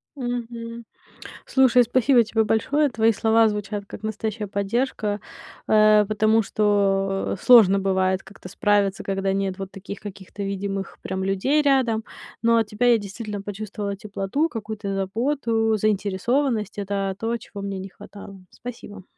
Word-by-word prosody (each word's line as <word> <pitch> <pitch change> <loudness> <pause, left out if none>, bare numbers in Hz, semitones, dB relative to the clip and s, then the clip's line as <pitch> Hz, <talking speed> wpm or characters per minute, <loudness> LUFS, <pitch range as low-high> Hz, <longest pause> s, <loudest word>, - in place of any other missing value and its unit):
Мгм. 235 -2 -5 0.6
Слушай, 255 -2 +4
спасибо 245 +1 +3
тебе 220 0 +1
большое. 280 +7 +1
Твои 225 -1 +3
слова 225 +1 +3
звучат 205 0 -4
как - - -10
настоящая 215 0 -3
поддержка. 205 +1 -1 0.5
Э, 215 -1 +5
потому 215 +1 +2
что, 195 -2 +1
э, - - -2
сложно 215 -6 +7
бывает 190 -1 +1
как-то 195 -2 -13
справиться, 200 0 +1
когда 195 0 -1
нет 195 -1 -2
вот 195 -1 -6
таких 200 +1 -8
каких-то 200 0 -8
видимых 195 0 -4
прям 190 0 -4
людей 195 +11 +1
рядом. 260 -6 +2 0.4
Но 230 0 +4
от 225 -2 +1
тебя 215 +3 0
я 235 - +5
действительно 205 0 -6
почувствовала 205 0 -5
теплоту, 205 +10 -2
какую-то 215 -3 -5
заботу, 225 +2 0
заинтересованность. 215 +3 0
Это 195 -1 -2
то, 230 +1 -1
чего 200 -3 -10
мне 195 -1 -4
не 190 +1 -7
хватало. 200 0 -12
Спасибо. 210 -5 -9
210 Hz, 140 wpm, -23 LUFS, 195-230 Hz, 0.6 s, сложно